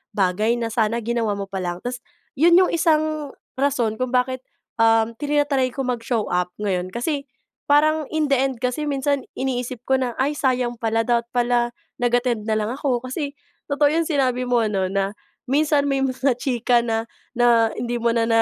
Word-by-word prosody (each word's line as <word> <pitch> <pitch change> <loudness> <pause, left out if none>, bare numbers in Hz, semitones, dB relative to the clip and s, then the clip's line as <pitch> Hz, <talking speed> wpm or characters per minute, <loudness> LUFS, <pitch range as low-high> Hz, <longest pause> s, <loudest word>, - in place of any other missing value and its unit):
bagay 205 +4 +2
na 230 -1 -3
sana 225 +1 0
ginawa 230 -3 0
mo 200 0 -6
pa 190 - -3
lang, 175 -1 -4
tas 245 0 -4 0.4
'yon 340 +2 +6
yung 365 +1 +5
isang 310 -3 +1 0.2
rason 250 -6 0
kung 255 - -1
bakit, 255 +1 +1 0.4
um, 225 0 +4
tina-try 290 -3 +1
ko 270 +2 -4
mag-show 240 -3 -1
up 180 0 +1
ngayon 185 -4 -1
kasi 280 - -3 0.4
parang 305 +1 +3
in 305 -3 -1
the - - +6
end 265 0 0
kasi 250 +4 -1
minsan 280 0 -1
iniisip 250 -2 -3
ko 265 0 +2
na, 245 -2 -2
"Ay, 275 +3 +1
sayang 250 -4 0
pala 225 0 +1
dapat 235 0 +1
pala 240 0 +1 0.2
nag-attend 245 -2 0
na 220 - +1
lang 215 +1 -1
ako", 255 -2 -1
kasi 280 +2 -4 0.3
totoo 290 0 +2
yung 330 - 0
sinabi 255 -5 0
mo 240 -2 +2
ano 195 -3 0
na 195 +1 -1 0.3
minsan 290 +2 +2
may 275 -1 +1
mga 265 0 +1
chika 245 -2 +2
na, 225 -1 -1 0.3
na 235 -1 +4
hindi 240 0 -3
mo 235 0 +1
na 230 - +2
na 225 0 +3
245 Hz, 185 wpm, -22 LUFS, 225-280 Hz, 0.4 s, yon